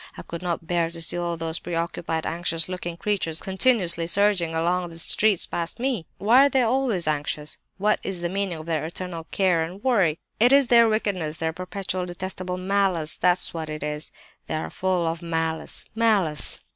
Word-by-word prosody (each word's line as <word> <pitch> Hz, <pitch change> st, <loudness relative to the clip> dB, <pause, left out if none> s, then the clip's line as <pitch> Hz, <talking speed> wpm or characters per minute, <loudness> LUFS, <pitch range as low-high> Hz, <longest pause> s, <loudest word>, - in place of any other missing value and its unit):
I -, -, -7 dB
could 170 Hz, -, -7 dB
not 170 Hz, -2 st, -2 dB
bear 170 Hz, -1 st, 0 dB
to 170 Hz, 0 st, -6 dB
see 165 Hz, -, +2 dB
all 175 Hz, -1 st, -2 dB
those 165 Hz, 0 st, 0 dB
preoccupied, 165 Hz, -1 st, -3 dB
anxious 165 Hz, -1 st, -1 dB
looking 175 Hz, -2 st, -5 dB
creatures 175 Hz, -4 st, -1 dB
continuously 190 Hz, -4 st, +1 dB
surging 185 Hz, -3 st, +2 dB
along 175 Hz, +2 st, 0 dB
the 165 Hz, -, -11 dB
streets 200 Hz, +3 st, +3 dB
past 170 Hz, +5 st, -4 dB
me! 245 Hz, -9 st, -1 dB
Why 245 Hz, +7 st, +6 dB
are -, -, -2 dB
they 265 Hz, -2 st, +2 dB
always 235 Hz, -, +1 dB
anxious? 150 Hz, 0 st, -2 dB, 0.2 s
What 210 Hz, +2 st, +2 dB
is 190 Hz, -3 st, -4 dB
the 175 Hz, -, 0 dB
meaning 190 Hz, -1 st, -2 dB
of 155 Hz, -, -9 dB
their 160 Hz, -2 st, -1 dB
eternal 170 Hz, 0 st, -5 dB
care 180 Hz, -4 st, +2 dB
and 180 Hz, +5 st, -8 dB
worry? 195 Hz, -12 st, +3 dB, 0.2 s
It 240 Hz, +3 st, +6 dB
is 275 Hz, -2 st, +5 dB
their 235 Hz, -1 st, +6 dB
wickedness, 185 Hz, -8 st, -1 dB
their 160 Hz, 0 st, -2 dB
perpetual 185 Hz, +1 st, -4 dB
detestable 180 Hz, 0 st, -4 dB
malice—that's 185 Hz, -2 st, +2 dB
what 160 Hz, -2 st, -5 dB
it 155 Hz, -1 st, -5 dB
is—they 150 Hz, +1 st, -7 dB
are 155 Hz, -, -2 dB
all -, -, -5 dB
full 185 Hz, -2 st, 0 dB
of 165 Hz, +1 st, -2 dB
malice, 160 Hz, -1 st, -2 dB
malice! 205 Hz, -9 st, +2 dB
175 Hz, 185 wpm, -24 LUFS, 165-200 Hz, 0.2 s, Why